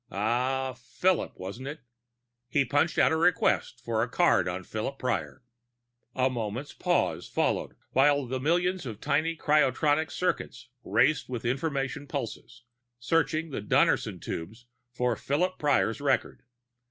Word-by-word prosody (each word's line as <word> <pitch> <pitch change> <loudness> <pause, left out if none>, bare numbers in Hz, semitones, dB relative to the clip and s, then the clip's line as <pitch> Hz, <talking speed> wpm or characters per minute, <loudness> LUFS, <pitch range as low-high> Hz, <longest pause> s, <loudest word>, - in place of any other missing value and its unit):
Ah... 125 +6 0
Philip, 165 +9 -1
wasn't 100 +8 -6
it? 150 +1 -6 0.7
He 140 0 +2
punched 145 +6 +1
out - - +5
a - - +2
request 165 -7 +2
for 115 -1 0
the - - -1
card 175 - +3
on 90 +1 -3
Philip 110 +8 -4
Prior. 120 - -3 0.7
A 130 0 +3
moment's 120 +2 -4
pause - - 0
followed, - - -1 0.2
while 140 +1 +4
the 130 +1 -3
millions 175 +3 +1
of 110 -3 -6
tiny 155 +6 0
cryotronic 150 +1 +2
circuits 130 -8 -3
raced 120 +9 +2
with 125 -1 -4
information 140 +2 -2
pulses, 120 -3 -6 0.3
searching 160 +4 0
the 130 - -3
Donnerson 105 - +2
tubes 110 +9 -6 0.3
for 125 -1 0
Philip 180 +10 -1
Prior's 140 -5 +1
record. 140 -2 0
130 Hz, 135 wpm, -28 LUFS, 120-150 Hz, 0.7 s, out